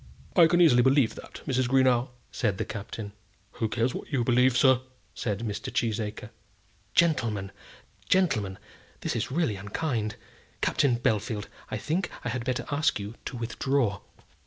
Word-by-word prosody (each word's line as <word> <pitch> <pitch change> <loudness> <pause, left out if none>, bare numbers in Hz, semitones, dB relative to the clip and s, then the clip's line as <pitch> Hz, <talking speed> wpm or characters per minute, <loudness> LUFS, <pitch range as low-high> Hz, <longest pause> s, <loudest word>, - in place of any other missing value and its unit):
"I 170 -4 +8
can 175 +2 +3
easily 130 -8 +6
believe 130 -2 +4
that, - - -11
Mrs. 130 -3 +1
Greenow," 130 -1 +3 0.2
said 105 -6 0
the - - -2
Captain. 105 0 -6 0.5
"Who 110 - +1
cares 115 +3 0
what - - -7
you 130 -4 +1
believe, 125 +1 +4
sir?" 130 -1 +5 0.3
said 105 -3 -2
Mr. 105 -3 -4
Cheesacre. 110 -1 -2 0.6
"Gentlemen! 115 - +2 0.6
gentlemen! 110 - +2 0.4
this - - -2
is - - -1
really 135 - 0
unkind. 105 +1 -2 0.4
Captain 130 -4 +2
Bellfield, 110 -3 0 0.2
I - - -2
think 175 +5 -1 0.2
I - - 0
had 120 0 -2
better 125 +1 -2
ask 145 -5 +2
you 100 +2 -6
to 125 - -5
withdraw." 115 -2 0
120 Hz, 150 wpm, -28 LUFS, 105-135 Hz, 0.6 s, I